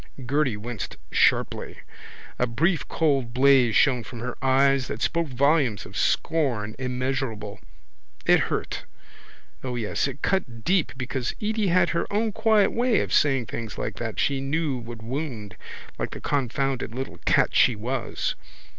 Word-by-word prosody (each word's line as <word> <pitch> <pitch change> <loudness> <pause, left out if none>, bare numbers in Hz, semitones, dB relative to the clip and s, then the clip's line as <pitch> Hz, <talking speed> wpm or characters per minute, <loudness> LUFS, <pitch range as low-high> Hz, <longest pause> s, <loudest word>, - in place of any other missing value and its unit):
Gerty 135 -3 +1
winced 115 +1 -6
sharply. - - +1 0.6
A 125 - +2
brief 160 +9 +1
cold 135 -7 0
blaze 130 -3 +5
shone 125 -5 +4
from 120 0 -9
her 125 +1 -4
eyes 135 0 +3
that 105 - -5
spoke 170 +5 0
volumes 135 -3 +2
of - - -12
scorn 125 -10 0
immeasurable. 125 -5 -3 0.7
It - - +6
hurt—O 125 -2 -7
yes, 115 +3 -1
it 140 +1 -8
cut 125 - -1
deep 180 -3 +2
because 125 -1 -3
Edy 215 -1 0
had 175 0 +3
her 170 - -2
own 215 +2 +1
quiet 215 -1 +3
way 240 -1 +2
of - - -3
saying 135 -4 +3
things 110 +1 -6
like - - -4
that 115 -2 -4
she 140 -1 +1
knew 140 -1 -1
would 115 -1 -9
wound 120 -5 -5 0.4
like - - -2
the - - -8
confounded 135 -3 -1
little 130 +1 -5
cat - - +3
she 120 - +5
was. 120 +4 -2
135 Hz, 145 wpm, -25 LUFS, 120-155 Hz, 0.7 s, It